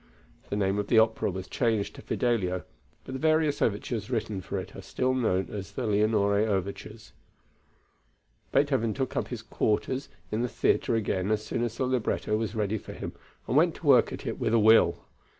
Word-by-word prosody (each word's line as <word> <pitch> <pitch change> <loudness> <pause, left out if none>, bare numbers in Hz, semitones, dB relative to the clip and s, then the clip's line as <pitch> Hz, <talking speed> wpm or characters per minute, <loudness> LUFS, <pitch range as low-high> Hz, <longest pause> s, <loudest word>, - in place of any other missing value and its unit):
The - - -2
name 100 0 +1
of 105 - -2
the 115 - +3
opera 110 -1 +3
was 95 0 -5
changed 115 -5 0
to - - -11
Fidelio, 95 -7 0 0.4
but 130 - -8
the 130 - -4
various 155 -1 +2
overtures 105 +1 -1
written 110 -5 -2
for - - -4
it - - -6
are - - -7
still 130 0 -1
known 95 -8 0
as 100 -2 -6
the 130 - -3
Leonore 105 -1 +2
overtures. 105 +2 -3 1.4
Beethoven 135 -6 +2
took 135 -1 -2
up - - -1
his 120 -3 -6
quarters 125 +4 -1 0.2
in 110 - 0
the 125 - -1
theatre 115 - +1
again 100 -3 -1
as 110 0 0
soon 115 - -2
as 120 -2 -3
the 130 - 0
libretto 125 -4 0
was 110 0 -2
ready 105 0 -1
for - - -10
him - - -6 0.3
and 125 - -1
went 160 +2 +4
to - - -11
work 130 -4 +5
at - - -7
it - - -3
with 110 - +1
a - - +5
will. 110 -5 +5
110 Hz, 195 wpm, -28 LUFS, 100-125 Hz, 1.4 s, work